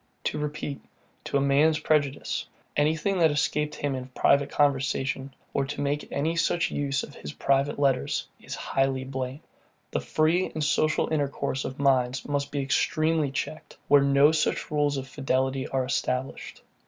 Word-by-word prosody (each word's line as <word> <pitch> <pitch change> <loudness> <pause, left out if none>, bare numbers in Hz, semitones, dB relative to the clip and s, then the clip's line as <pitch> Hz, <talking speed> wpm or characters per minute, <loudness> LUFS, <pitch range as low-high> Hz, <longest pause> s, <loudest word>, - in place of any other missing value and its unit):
To - - -1
repeat, 150 -1 -4 0.4
to - - 0
a - - +2
man's 145 +3 +4
prejudice, 150 -2 0 0.3
anything 160 +6 +1
that 165 -2 +5
escaped 150 0 0
him 145 -2 -2
in 130 -1 -5
private 140 +2 +2
conversation, 135 -1 0 0.2
or 140 - +1
to 140 - -6
make 145 +1 -2
any 160 +4 0
such 170 0 +1
use 140 -1 -1
of - - -9
his 75 - -8
private 140 +1 +1
letters, 135 -3 +1 0.2
is - - -6
highly 135 -1 0
blamed. 130 +1 -5 0.5
The - - 0
free 155 - +1
and 155 - -1
social 155 +1 +2
intercourse 140 -2 -1
of 130 - -5
minds 130 -2 +1
must 145 -1 -1
be 145 - -1
extremely 155 +2 +1
checked, 145 +3 -5
where 145 0 +7
no 140 +2 +5
such 160 -1 0
rules 145 -1 +1
of 135 0 -5
fidelity 135 -1 -1
are 130 -1 -1
established. 125 0 -3
140 Hz, 160 wpm, -27 LUFS, 135-150 Hz, 0.5 s, where